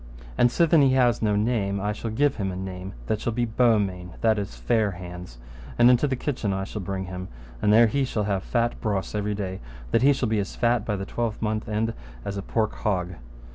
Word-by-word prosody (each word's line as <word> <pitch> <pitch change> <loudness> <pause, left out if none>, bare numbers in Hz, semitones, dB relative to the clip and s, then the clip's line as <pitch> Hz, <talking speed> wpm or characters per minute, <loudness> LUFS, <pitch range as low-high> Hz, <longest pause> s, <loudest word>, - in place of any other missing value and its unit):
And 120 - +4
sithen 165 +3 +4
he 135 -2 +4
hath 120 -2 +3
no 105 -2 +2
name, 105 -2 0
I 105 +2 -1
shall 115 +2 -5
give 140 +6 +1
him 95 -3 -1
a - - -5
name 95 0 -6
that 110 - -1
shall 120 - -1
be 120 +1 0
Beaumains, 105 -6 +1
that 110 -2 +3
is 100 -11 -5
Fair 100 - +1
hands, 90 -6 -9 0.4
and 120 +1 +7
into 125 +4 +3
the 135 - 0
kitchen 125 -6 -2
I 95 0 -2
shall 105 +1 -5
bring 95 0 -3
him, 90 0 -6 0.3
and 105 - +3
there 115 +2 +7
he 135 +5 +1
shall 110 -4 -1
have 100 -2 0
fat 120 +3 -1
brose 100 -4 -2
every 105 0 -1
day, 95 -2 -4 0.3
that - - +3
he 140 +3 +6
shall 130 -3 0
be 110 -1 +1
as 100 - -4
fat 120 -2 +1
by 105 - -1
the 95 0 -4
twelvemonths' 110 -1 -2
end 110 +2 0 0.3
as 100 - -3
a 100 - -3
pork 110 +2 -1
hog. 90 -5 -1
105 Hz, 225 wpm, -25 LUFS, 95-120 Hz, 0.4 s, and